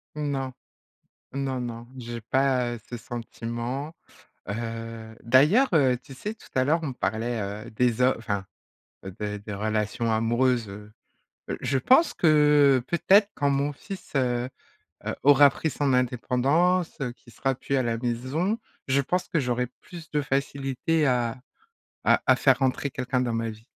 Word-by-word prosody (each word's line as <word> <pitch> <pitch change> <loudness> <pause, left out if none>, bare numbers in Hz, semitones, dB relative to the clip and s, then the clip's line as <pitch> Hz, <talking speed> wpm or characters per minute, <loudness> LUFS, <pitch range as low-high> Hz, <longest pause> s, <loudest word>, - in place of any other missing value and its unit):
Non, 135 -3 -2 0.8
non, 135 -2 -2
non, 120 -1 -6
j'ai 120 -1 -6
pas, 125 +1 +1
heu, 115 - -10
ce 120 - -5
sentiment, 120 +5 -5 0.6
heu, 115 0 -5
d'ailleurs, 150 - +5
heu, 130 -5 +4
tu 140 - -13
sais 210 +10 -5
tout - - -18
à 130 - +3
l'heure, 160 +5 +2
on 140 -4 -3
parlait, 110 +3 -2 0.3
heu, - - -9
des 120 +2 +1
ho 130 +1 +4
enfin, 100 -4 -3 0.7
des 105 -1 -3
des 105 0 -7
relations 110 +2 -1
amoureuses, 120 +1 +1
heu, 105 +1 -10 0.7
je 135 - 0
pense 260 - +4
que, 150 -3 +5
heu, - - -7
peut-être 200 +4 +4
quand 145 -1 +1
mon 140 +1 0
fils, 195 +6 -10
heu 125 -1 +1 0.6
heu, - - -2
aura 145 0 +7
pris 160 +3 -2
son 140 0 0
indépendance, 135 +9 +1
heu, 125 - -1
qu'il 120 -1 -19
sera 135 -1 -1
plus 140 +2 -2
à 130 - +2
la 115 -1 -1
maison, 130 - -1 0.3
je 135 +1 +3
pense 180 +7 -1
que 170 - +1
j'aurais 125 -2 0
plus 170 -3 -11
de 150 - +1
facilité 140 +2 0
à 125 -1 0 0.6
à - - +4
à - - +7
faire - - +3
rentrer 135 +1 0
quelqu'un 130 0 -1
dans 120 -2 -1
ma 115 0 -1
vie. 110 +1 -11
130 Hz, 160 wpm, -26 LUFS, 115-145 Hz, 0.8 s, aura